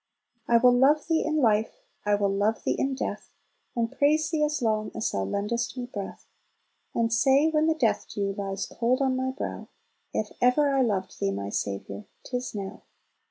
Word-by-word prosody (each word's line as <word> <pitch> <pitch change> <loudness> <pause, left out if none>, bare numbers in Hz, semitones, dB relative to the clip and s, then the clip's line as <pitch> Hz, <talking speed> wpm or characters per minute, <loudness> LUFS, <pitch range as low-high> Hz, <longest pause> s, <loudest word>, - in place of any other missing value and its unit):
"I 235 - +5
will 245 +1 +6
love 280 +5 +4
Thee 325 -1 +1
in 310 0 0
life, 225 - +1 0.2
I 205 - +4
will 200 -1 +1
love 210 +3 0
Thee - - +1
in 270 0 -1
death, 265 - -4 0.5
And 230 -1 0
praise 310 +2 +2
Thee 310 -2 +1
as 300 0 0
long 215 -3 0
as 220 - -1
Thou 95 -1 -1
lendest 210 - -2
me 250 - -3
breath: 205 -5 -7 0.7
And 230 -1 +1
say, 270 +5 +4
when 310 0 +2
the 320 - +3
death 245 -8 +1
dew 200 -1 -1
lies 195 -1 -3
cold 245 +2 0
on 265 -2 +1
my 260 0 -1
brow, 260 - -5 0.4
If 215 - -2
ever 275 +3 +4
I 270 - +3
loved 195 -6 -1
Thee, 100 - +1
my 100 0 -3
Saviour, 100 0 -4 0.2
'tis 250 -2 -4
now!" 195 -2 -6
235 Hz, 190 wpm, -27 LUFS, 205-275 Hz, 0.7 s, will